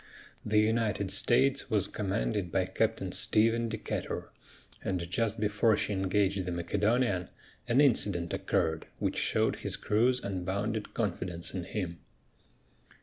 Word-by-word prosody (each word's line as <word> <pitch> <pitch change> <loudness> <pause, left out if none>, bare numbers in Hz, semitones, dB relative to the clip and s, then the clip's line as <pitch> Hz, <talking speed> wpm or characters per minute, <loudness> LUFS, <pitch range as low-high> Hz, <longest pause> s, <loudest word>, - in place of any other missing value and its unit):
The 105 0 +1
United 105 -3 +1
States 120 +6 +2
was 100 -3 +2
commanded 100 -2 -2
by - - +1
Captain - - -1
Stephen 115 +2 +2
Decatur, 110 -1 -4 0.5
and 90 -3 -2
just 110 +4 0
before 105 +1 +2
she 105 - -1
engaged 95 0 +1
the 90 - -4
Macedonian 100 +3 0 0.4
an 120 +2 +3
incident 100 - +2
occurred 80 0 0
which - - -1
showed - - +1
his - - -3
crew's 120 +4 +2
unbounded 100 +3 -3
confidence 90 -5 -2
in 90 -2 -4
him. 90 -6 -4
105 Hz, 125 wpm, -30 LUFS, 95-110 Hz, 0.5 s, an